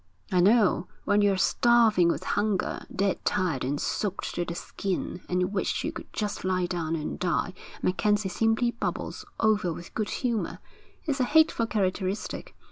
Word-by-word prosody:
'I 180 - +3
know. 200 -2 +4 0.2
When 205 +1 +3
you're 200 -2 +3
starving 225 -2 +4
with - - -1
hunger, 210 -3 -1
dead 195 0 0
tired 180 -9 0
and 140 +3 -1
soaked 200 -2 -2
to 175 - -1
the 170 0 -5
skin, 185 -1 -3
and 180 +2 0
wish 195 - -1
you - - -1
could - - -9
just 210 -1 -3
lie 185 -1 +1
down 170 -2 -2
and 155 -2 -4
die, 180 0 0 0.3
MacKenzie 205 +1 +1
simply 225 +4 +2
bubbles 435 - -4
over 215 -5 +2
with 170 +1 -8
good 215 -2 -2
humour. 235 -5 -1 0.5
It's 290 -4 -1
a - - +4
hateful 290 -4 +4
characteristic. 190 -1 -2
195 Hz, 160 wpm, -27 LUFS, 180-220 Hz, 0.5 s, know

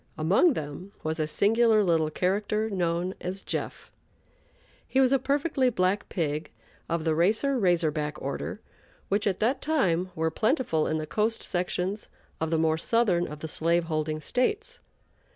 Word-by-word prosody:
Among 190 - +4
them 155 - -6
was 160 +1 -2
a 155 - 0
singular 220 +5 +3
little 165 -4 +2
character, 205 +6 0
known 175 -1 -1
as 190 +2 -4
"Jeff." - - -5 1.0
He 265 - +1
was 260 -1 +4
a 270 - +4
perfectly 275 0 +1
black 190 -2 0
pig 155 -3 -2 0.4
of 165 -1 -1
the 160 -1 +1
"Racer 215 - +2
Razor 175 -5 +2
Back" 150 0 -3
order, 140 +9 -4 0.5
which, 205 +2 +1
at 190 -2 0
that 255 +5 +1
time, 185 - +1
were 160 0 0
plentiful 220 - +1
in 155 - 0
the 155 - -3
coast 215 +7 -1
sections 180 +3 -2 0.3
of 160 - -1
the 165 - +1
more 160 0 +2
southern 195 -5 +2
of 150 0 -9
the 160 - -4
slave 170 +2 +1
holding 155 -1 -2
States. 425 - -1
180 Hz, 160 wpm, -27 LUFS, 160-220 Hz, 1.0 s, Among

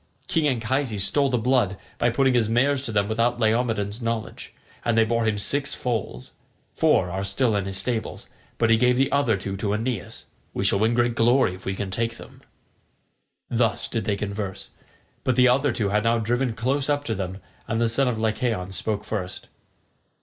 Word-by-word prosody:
King 160 -2 +1
Anchises 120 -4 0
stole 140 +6 +3
the 125 - +1
blood 115 -5 +1 0.2
by 120 - +3
putting 130 +2 +2
his 115 -3 +2
mares 130 +4 +2
to 115 - -3
them 100 -1 +1
without 115 +2 0
Laomedon's 110 -1 0
knowledge, 115 -1 -4 0.3
and 115 -1 +1
they 115 - +6
bore 115 +1 0
him 110 -1 +1
six 140 +7 0
foals. 110 - -4 0.4
Four 90 - +3
are 95 +2 -3
still 105 +4 +1
in 100 -2 0
his 95 0 -3
stables, 110 +3 -3 0.3
but 115 -1 +2
he 115 - +6
gave 125 +1 +3
the 135 +1 +2
other 125 -7 +2
two 95 +1 -5
to 100 +1 -1
Aeneas. 115 -2 -4 0.3
We - - -1
shall 100 - +3
win 110 +2 +2
great 120 0 +2
glory 120 -3 +3
if 90 - -12
we 95 - -2
can 95 -1 -4
take 115 +3 -2
them." - - -13 1.1
Thus 115 -1 0
did 115 - -3
they 105 -2 +1
converse, 100 -1 -4 0.5
but 130 - +1
the 125 0 +5
other 135 +3 +3
two 105 -3 -1
had 105 +1 +1
now 115 +1 +3
driven 120 +2 0
close 135 +5 -1
up 145 0 +1
to 115 - -2
them, 95 -2 -4 0.3
and 110 - -1
the 115 - +3
son 130 +4 +2
of 120 -3 0
Lycaon 110 -3 -1
spoke 105 +2 -2
first. 95 -4 -5
115 Hz, 195 wpm, -24 LUFS, 105-125 Hz, 1.1 s, they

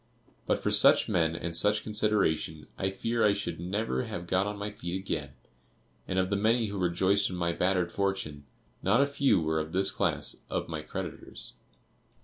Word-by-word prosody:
But - - +2
for - - +1
such - - +6
men 80 -1 +1
and 85 0 -4
such 105 +4 +3
consideration 105 -8 0
I 95 - -1
fear 115 +4 -1
I 105 - +5
should 100 -4 -4
never 90 -6 -2
have 85 - -5
got 95 +3 +1
on 105 0 -4
my 105 +1 -4
feet 90 -3 -4
again; 95 - -4 0.7
and 95 - -2
of 95 +1 +1
the - - +2
many 110 +2 +2
who 100 -1 -4
rejoiced 95 +3 +2
in 90 - -5
my 85 -1 0
bettered 90 0 +1
fortune, 90 -8 -2 0.4
not 110 +8 +3
a - - +3
few 140 -7 +2
were 80 0 0
of 80 +1 -5
this 95 +1 +4
class - - 0
of - - -2
my 80 -2 -4
creditors. 75 - -7
95 Hz, 185 wpm, -29 LUFS, 85-105 Hz, 0.7 s, such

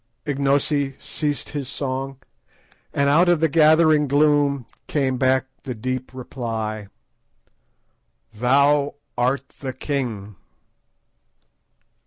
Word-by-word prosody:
Ignosi 140 0 +1
ceased 145 -2 -2
his 140 -4 -5
song, 135 0 -4 0.7
and 140 0 +1
out 165 +5 +4
of 175 -2 +4
the 160 - +3
gathering 155 0 +4
gloom 145 -2 +2 0.2
came 135 -3 0
back 130 0 +2 0.2
the 125 -3 -5
deep 130 +3 -4
reply— 115 -5 -5 1.5
"_Thou 140 +5 +3 0.2
art 130 +3 0
the 130 -2 -4
king! 120 - -4
135 Hz, 95 wpm, -22 LUFS, 130-145 Hz, 1.5 s, out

